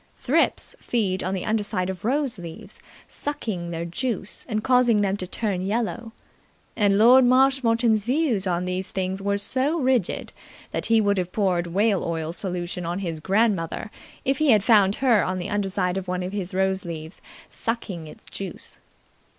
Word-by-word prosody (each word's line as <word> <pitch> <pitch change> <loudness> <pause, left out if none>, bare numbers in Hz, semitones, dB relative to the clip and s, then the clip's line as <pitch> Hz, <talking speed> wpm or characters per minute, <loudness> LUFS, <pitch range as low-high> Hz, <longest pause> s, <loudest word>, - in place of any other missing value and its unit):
Thrips - - +1
feed 195 -6 -1
on 185 +1 -1
the 185 - -3
underside 205 -4 0
of 190 -2 -5
rose 260 -2 0
leaves, 170 -2 -8 0.3
sucking 220 -12 -4
their 170 0 -4
juice 205 +3 -3
and 215 -1 -1
causing 250 -4 +4
them 195 -1 +1
to 185 - -5
turn 195 -2 -2
yellow; 225 +3 -2 0.6
and 200 -2 +3
Lord 245 +5 +7
Marshmoreton's 245 -4 +3
views 250 -7 +1
on 180 0 0
these 185 +1 -3
things 190 0 -3
were 200 0 0
so 260 +9 0
rigid 255 - 0 0.4
that - - 0
he 225 -1 +4
would 200 -2 +2
have 180 0 -3
poured 180 -4 0
whale 200 +3 +1
oil 165 -1 -2
solution 180 -1 -3
on 170 +1 -2
his 170 -5 -4
grandmother 200 +1 0 0.3
if 270 0 +1
he 310 -2 +3
had 215 -5 +5
found 205 -3 +5
her 240 -6 +3
on 185 0 -2
the 180 - -4
underside 195 -2 0
of 190 -1 -4
one 180 0 -2
of 180 - -4
his 190 -3 -2
rose 190 0 +1
leaves 160 -1 -7 0.3
sucking 200 -8 -4
its - - -14
juice. 195 -3 -7
200 Hz, 170 wpm, -24 LUFS, 180-230 Hz, 0.6 s, Lord